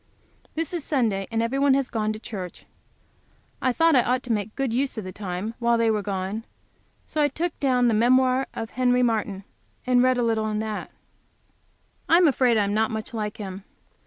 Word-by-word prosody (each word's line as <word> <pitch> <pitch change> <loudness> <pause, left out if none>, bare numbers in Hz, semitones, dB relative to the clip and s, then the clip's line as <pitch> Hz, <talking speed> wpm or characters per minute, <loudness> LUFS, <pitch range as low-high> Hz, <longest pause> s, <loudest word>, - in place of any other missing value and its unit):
This 325 +1 -2
is 340 -4 -2
Sunday, 220 -10 0
and 225 0 0
everybody 270 +3 +2
has 275 -2 0
gone 215 -2 -1
to 215 - -5
church. 195 -5 -8 1.0
I 255 - +2
thought 325 +4 +3
I 250 - +6
ought 250 +2 0
to 245 - -4
make 205 -3 0
a 220 - -23
good 270 -4 -1
use 265 0 0
of 220 - -3
the 185 - -6
time 190 +3 -4
while 235 -1 +2
they 230 -1 +3
were 210 -1 0
gone, 195 +2 -3 0.6
so 310 - -2
I 295 - +5
took 325 +4 -3
the 255 -3 +2
Memoir 255 +3 +3
of 225 - -5
Henry 250 0 +2
Martyn, 215 -4 -1 0.4
and 250 -1 +4
read 255 0 +3
a 245 - +1
little 220 -2 0
in 210 - -2
that. 215 -1 -4 1.2
I 335 - +7
am 350 -1 +5
afraid 255 -4 +3
I 210 - +3
am 200 0 -1
not 220 +1 +2
much 220 +1 -5
like 210 -2 -3
him. 195 -2 -7
230 Hz, 205 wpm, -25 LUFS, 215-255 Hz, 1.2 s, I